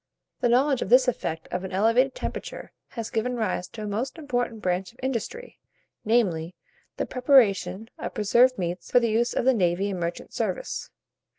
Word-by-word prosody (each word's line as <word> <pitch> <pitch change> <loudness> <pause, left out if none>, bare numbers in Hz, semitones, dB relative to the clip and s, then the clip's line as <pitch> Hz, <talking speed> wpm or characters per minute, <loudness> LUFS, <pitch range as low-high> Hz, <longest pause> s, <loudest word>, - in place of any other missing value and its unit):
The 245 - +2
knowledge 265 +2 +3
of - - -3
this 255 +1 +6
effect 165 -9 -2
of 180 +1 -2
an 190 - -5
elevated 230 +7 +3
temperature - - -6 0.2
has 230 -2 -6
given 245 +3 -1
rise 185 -5 -1
to 215 - -8
a - - -4
most 230 +9 -3
important 245 -7 -2
branch 180 -1 -1
of 245 - -29
industry, 265 - -4 0.4
namely, 185 -7 +1 0.4
the - - -1
preparation 225 -7 +3
of - - -5
preserved 240 +4 +4
meats 175 0 -4
for 245 - +5
the 235 -2 0
use 235 +2 +1
of - - 0
the 265 - +5
navy 190 -1 +1
and 185 - -4
merchant 170 0 -4
service. - - -3
225 Hz, 180 wpm, -26 LUFS, 185-250 Hz, 0.4 s, this